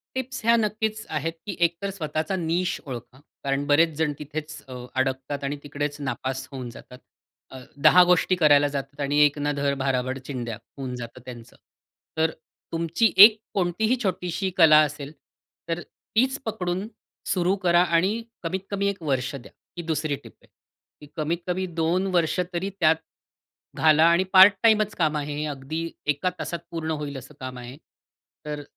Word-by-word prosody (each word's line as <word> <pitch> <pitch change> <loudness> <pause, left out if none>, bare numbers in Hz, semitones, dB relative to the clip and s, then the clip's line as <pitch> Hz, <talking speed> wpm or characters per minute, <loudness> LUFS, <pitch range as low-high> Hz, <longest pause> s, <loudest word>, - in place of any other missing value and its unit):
Tips 260 0 -4
ह्या 230 +1 +5
नक्कीच 220 0 -1
आहेत. 160 +1 -2
की 200 - -4
एकतर 170 +4 -5
स्वतःचा 160 -1 -3
निश 175 +1 -1
ओळखा. 125 0 -8 0.2
कारण 135 +1 0
बरेच 150 +4 +5
जण 160 -2 +1
तिथेच 155 +1 -7
अ, 130 - -8 0.3
अडकतात 135 +2 -2
आणि 140 +1 -2
तिकडेच 145 0 -4
नापास 130 -1 -3
होऊन 130 -3 -6
जातात. 125 +1 -13 0.5
अ, 130 - -9 0.3
10 180 - +8
गोष्टी 180 +1 +3
करायला 145 -4 +5
जातात 140 0 -6
आणि 145 +1 0
"एक 145 0 +2
ना-धड, 145 -1 0
भाराभर 130 -1 -1
चिंध्या" 120 -5 -4 0.2
होऊन 130 -3 -5
जातं 120 +1 -8
त्यांचं. 120 -2 -11 0.6
तर, 160 0 +2 0.4
तुमची 170 +7 +1
एक, 210 +3 +10 0.2
कोणतीही 200 +6 +1
छोटीशी 190 -1 -2
कला 160 -3 +7
असेल. 145 -1 -4 0.6
तर, 165 +1 -1
तीच 260 +5 -1
पकडून, 190 -3 -2 0.4
सुरू 180 0 +1
करा 175 0 +5
आणि 185 +5 +2 0.3
कमीत-कमी 195 +3 -2
1 200 -3 -4
वर्ष 135 -3 -1
द्या. 135 -3 -10 0.3
ही - - -3
2री 155 -2 -1
टिप - - -14
आहे. - - -24 0.5
ती 150 - -12
कमीत 160 +2 -1
कमी 185 +1 -1
2 170 +4 +1
वर्ष 165 -2 +1
तरी 175 +3 -2
त्यात 160 0 +5 0.8
घाला 155 0 +5
आणि 170 +2 +4
पार्ट-टाईमच 210 +2 +6
काम 155 -3 +1
आहे, 150 0 -3
अगदी 140 +4 -5 0.3
एका 150 +5 +1
तासात 170 - -4
पूर्ण 165 -2 -4
होईल 145 -1 -5
असं 135 +3 -12
काम 130 -1 -6
आहे. 125 +2 -9 0.7
तर 150 -1 -4
155 Hz, 155 wpm, -25 LUFS, 140-185 Hz, 0.8 s, एक